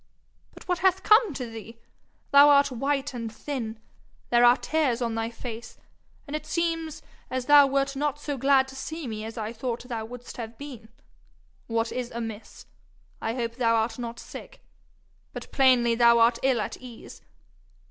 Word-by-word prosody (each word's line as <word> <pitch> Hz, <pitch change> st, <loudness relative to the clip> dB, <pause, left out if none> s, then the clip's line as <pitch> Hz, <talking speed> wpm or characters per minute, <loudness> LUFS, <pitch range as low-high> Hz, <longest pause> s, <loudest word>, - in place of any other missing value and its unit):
But -, -, -14 dB
what 360 Hz, -1 st, 0 dB
hath 380 Hz, -1 st, +2 dB
come 430 Hz, -2 st, +5 dB
to 255 Hz, -, -4 dB
thee? 225 Hz, 0 st, -10 dB, 0.5 s
Thou 285 Hz, +1 st, +8 dB
art 280 Hz, -1 st, +5 dB
white 275 Hz, +3 st, -1 dB
and 230 Hz, -2 st, -5 dB
thin, 230 Hz, -3 st, -5 dB, 0.5 s
there 240 Hz, 0 st, +5 dB
are 240 Hz, +1 st, +7 dB
tears 290 Hz, -8 st, 0 dB
on 235 Hz, -2 st, -1 dB
thy 225 Hz, 0 st, -2 dB
face, 235 Hz, 0 st, -8 dB, 0.5 s
and 285 Hz, -, -5 dB
it 305 Hz, -, -5 dB
seems 330 Hz, -2 st, -2 dB, 0.3 s
as 255 Hz, -1 st, -3 dB
thou 290 Hz, 0 st, +7 dB
wert 275 Hz, 0 st, 0 dB
not 290 Hz, 0 st, -1 dB
so 290 Hz, -1 st, -4 dB
glad 270 Hz, 0 st, +3 dB
to 265 Hz, -, -11 dB
see 315 Hz, +3 st, -6 dB
me 215 Hz, -3 st, -5 dB
as 225 Hz, +2 st, -8 dB
I 220 Hz, 0 st, -4 dB
thought 235 Hz, +1 st, -4 dB
thou 235 Hz, -3 st, -5 dB
wouldst 245 Hz, +1 st, -10 dB
have 230 Hz, -1 st, -7 dB
been. 250 Hz, -6 st, -10 dB, 0.8 s
What 230 Hz, 0 st, -1 dB
is 250 Hz, -1 st, -4 dB
amiss? 225 Hz, -2 st, -7 dB, 0.6 s
I 225 Hz, +1 st, -2 dB
hope 235 Hz, -1 st, -3 dB
thou 230 Hz, -2 st, +2 dB
art 225 Hz, +1 st, -1 dB
not 235 Hz, -1 st, -6 dB
sick -, -, -11 dB, 0.7 s
but -, -, -8 dB
plainly 250 Hz, -3 st, +4 dB
thou 235 Hz, 0 st, +5 dB
art 230 Hz, 0 st, +4 dB
ill 260 Hz, -3 st, +2 dB
at -, -, -5 dB
ease! 245 Hz, -3 st, -12 dB
245 Hz, 175 wpm, -26 LUFS, 230-280 Hz, 0.8 s, Thou